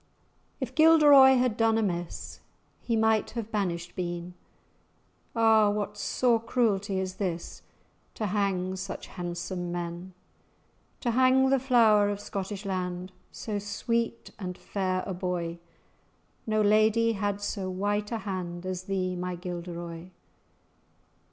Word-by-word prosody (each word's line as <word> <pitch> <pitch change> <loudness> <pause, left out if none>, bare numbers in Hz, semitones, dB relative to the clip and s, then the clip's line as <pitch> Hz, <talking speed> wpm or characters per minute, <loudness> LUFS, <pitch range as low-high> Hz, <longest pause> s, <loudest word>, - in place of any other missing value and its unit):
"If 260 -2 -4
Gilderoy 295 -3 +7
had 250 -3 +1
done 225 0 +3
amiss, 175 -6 -3 0.4
He 230 - -1
might 220 -1 +2
have 225 -1 -4
banished 175 -4 -2
been; 175 0 -4 1.0
Ah! 220 -2 +5
what 205 0 -2
sore 235 +2 +1
cruelty 205 -5 0
is 185 0 -4
this 175 -4 -4 0.5
To 215 - -2
hang 190 -2 0
such 190 +1 -6
handsome 175 0 -5
men! 175 +1 -5 0.9
To 240 - 0
hang 260 +2 +4
the 270 - +4
flower 225 -5 +4
of 205 -1 -3
Scottish 200 0 -5
land, 185 -1 -3 0.2
So 210 -2 -4
sweet 230 +3 -2
and 180 -2 -5
fair 185 -2 -2
a 190 - -3
boy! 175 -2 -3 0.9
No 215 0 +2
lady 215 +2 +4
had 205 -1 -2
so 200 -2 -3
white 205 +3 -1
a 230 - -1
hand 185 -4 -5
As 185 0 -4
thee, 185 -2 -1
my 180 0 -3
Gilderoy! 175 -1 -6
200 Hz, 125 wpm, -28 LUFS, 180-220 Hz, 1.0 s, Gilderoy